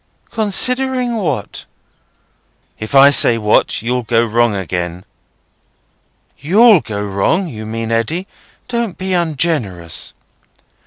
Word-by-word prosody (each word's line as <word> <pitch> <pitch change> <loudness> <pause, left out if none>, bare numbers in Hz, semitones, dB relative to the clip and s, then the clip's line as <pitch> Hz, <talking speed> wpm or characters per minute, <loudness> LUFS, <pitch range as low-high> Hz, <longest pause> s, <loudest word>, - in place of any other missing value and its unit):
"Considering 250 +3 0
what?" 150 - -3 1.1
"If 110 +5 -5
I 140 +1 +8
say 120 -4 +4
what, 105 0 +1
you'll 125 +2 -1
go 115 0 +1
wrong 115 -1 +1
again." 90 -1 -4 1.3
"You'll 210 +5 +5
go 105 -3 -5
wrong, 100 - 0
you 110 -9 -8
mean, 115 +1 -4
Eddy. 115 +11 -1 0.4
Don't 235 -6 -3
be 190 0 -3
ungenerous." 145 - -1
125 Hz, 105 wpm, -16 LUFS, -, 1.3 s, I